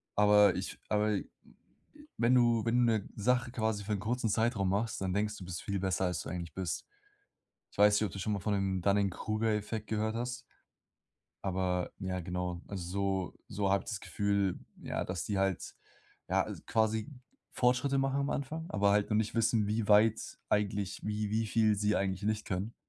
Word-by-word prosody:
Aber 105 0 +6
ich - - -5
aber 105 -1 +2 1.0
wenn 120 +2 +3
du 120 -2 +4
wenn 115 +1 +2
du - - +4
'ne 105 -3 -2
Sache 120 +3 +1
quasi 110 -4 -1
für 105 - -5
'nen 100 - -1
kurzen 115 0 -1
Zeitraum 110 -3 +1
machst, 100 +1 -1
dann 95 -1 -1
denkst 105 +1 0
du: 95 - -9
„Du - - -8
bist 85 -2 -5
viel 100 -1 -2
besser, 95 0 0
als 90 -1 -1
du - - -7
eigentlich 85 -2 -5
bist“. 95 -3 -3 0.9
Ich - - -20
weiß 105 0 +6
nicht, 110 - +1
ob 100 - -4
du 100 - -7
schon 105 +3 -1
mal 100 - -1
von 105 +2 -1
dem 95 -2 0
Dunning-Kruger-Effekt 105 +2 0
gehört 110 +1 -1
hast 125 +1 -2 1.1
aber 90 -1 0
ja, 95 -2 -3
genau, 90 0 -3
also, 95 0 -2
so - - -32
so 100 -1 -1
habe 100 - +2
ich - - -6
das 105 - -4
Gefühl, 100 -2 0 0.2
ja, - - -2
dass 90 -3 -3
die 100 -2 -1
halt 95 -2 -1 0.5
ja, - - +3
al - - -6
quasi 110 +2 +1 0.4
Fortschritte 130 +3 +2
machen 135 +1 +1
am 140 - -1
Anfang, 155 +4 -3
aber 100 0 +3
halt 105 0 +3
noch 105 - +2
nicht 110 +1 0
wissen, 115 -2 +2
wie 105 +1 -1
weit 110 +1 +5 0.3
eigentlich 100 -1 0
wie 105 0 -2
wie 110 +1 +1
viel 110 0 +3
sie 105 +1 +1
eigentlich 95 0 -1
nicht 110 0 0
können. 100 +4 -3
105 Hz, 195 wpm, -32 LUFS, 95-110 Hz, 1.1 s, Aber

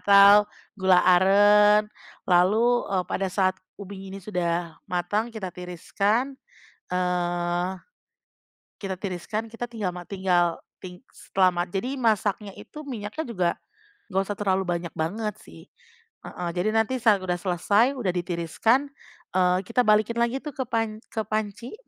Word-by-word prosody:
atau 200 +1 +7 0.3
gula 185 -1 +4
aren 205 +3 +5 0.4
lalu, 215 +7 +3
e 195 - -1
pada 195 +1 -2
saat 185 +1 +1 0.2
ubi 195 -1 -9
ini - - -6
sudah 170 -4 -2
matang 195 +5 -1
kita 210 -6 -6
tiriskan. 200 +8 -1 0.6
Eee, 175 0 -1 1.2
tiriskan, 200 +4 -4
kita 230 +2 -6
tinggal 215 -6 -3
mati 180 +2 -8
tinggal, 175 -3 +2 0.2
ti 180 -1 -9 0.4
selama 180 -2 +3
jadi 245 +9 -2
masaknya 215 -4 0
itu 305 - -10
minyaknya 235 +2 -5
juga, 185 -8 0 0.6
nggak 190 0 +1
usah 205 +1 -5
terlalu 190 -2 +1
banyak 170 -1 -2
banget 210 +6 -2
sih 80 0 -15 0.6
heeh, 175 -1 -5
jadi 195 +5 +1
nanti 225 +3 +1
saat 215 -5 +3
udah 180 -1 -1
selesai, 200 +7 +2
udah 245 -8 -3
ditiriskan, 180 - 0 0.5
eee, 180 -1 +3
kita 240 +2 +2
balikin 215 +2 +3
lagi 235 +2 +1
tuh 300 - -5
ke 260 - -1
pan 225 -2 -1
ke 220 - -1
panci, 215 - -4
195 Hz, 135 wpm, -25 LUFS, 180-220 Hz, 1.2 s, atau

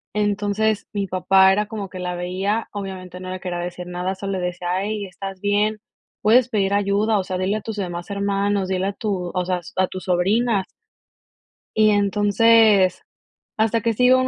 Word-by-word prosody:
Entonces, 205 +1 0
mi 200 -1 -1
papá 190 +1 +4
era 210 +2 +1
como 210 -3 -6
que - - -9
la 180 0 -3
veía, 190 +5 -2
obviamente, 190 -3 -7
no 185 0 -7
le 185 - -5
quería 180 -1 -4
decir 180 0 -5
nada, 180 +2 -3
solo 195 0 -4
le 185 - -2
decía: 180 +1 -2
"Ey, 210 -1 -3
¿estás 195 0 -8
bien? 205 +2 +1 0.4
Puedes 245 +3 +4
pedir 200 -3 0
ayuda, 205 +2 +2
o - - -1
sea, 185 0 -3
dile 190 +3 0
a 215 - -6
tus 220 0 -5
demás 175 -2 -5
hermanos, 200 -1 0
dile 190 0 0
a 200 - -2
tu, 190 -5 -3
o 180 -1 -1
sea, 180 0 -1
s 175 - -13
a 185 - +3
tus 185 +1 -8
sobrinas". 195 +3 +1 1.1
Y, 215 0 +6
entonces, 205 -1 +4 0.5
hasta 225 0 +2
que 230 0 +1
sí 250 - 0
llegó 255 +1 +6
un 255 - +1
200 Hz, 195 wpm, -22 LUFS, 185-210 Hz, 1.1 s, Y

